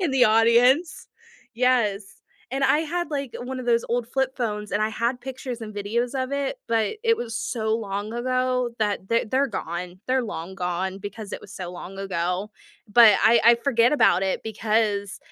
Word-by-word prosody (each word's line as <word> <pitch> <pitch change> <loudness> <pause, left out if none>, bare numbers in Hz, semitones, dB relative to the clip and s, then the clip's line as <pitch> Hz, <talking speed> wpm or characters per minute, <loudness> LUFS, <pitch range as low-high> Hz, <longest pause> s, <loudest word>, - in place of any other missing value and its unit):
In 350 -6 0
the 265 -2 +4
audience, 235 +8 +3 0.5
yes, 235 -5 +2 0.5
and 270 +1 0
I 295 - +4
had 330 +1 -2
like 275 -4 -3
one 255 +1 -5
of 250 - -8
those 235 -1 +2
old 235 0 -1
flip 265 +1 -1
phones, 210 -4 -3
and 210 - +1
I 215 - +2
had 235 +3 -2
pictures 260 -2 -6
and 215 -1 -7
videos 230 +5 -2
of 260 +2 -3
it, 280 -1 -2
but 225 - 0
it 455 0 +4
was 230 - -5
so 220 -2 -1
long 205 0 -4
ago 255 0 0
that 205 -3 -1
the 230 0 +2
they're 270 +2 +2
gone 180 -4 -5
they're 260 -1 +1
long 190 -3 -6
gone 185 +1 -2
because 205 +1 -8
it - - -5
was 200 - -13
so 180 -2 -6
long 180 +2 -9
ago. 185 +1 -2 0.4
But 215 -2 +7
I 230 +1 +6
I 235 0 +8
forget 235 0 +2
about 190 -10 +4
it 190 -1 -1
because 210 -2 -1
230 Hz, 190 wpm, -24 LUFS, 205-255 Hz, 0.5 s, I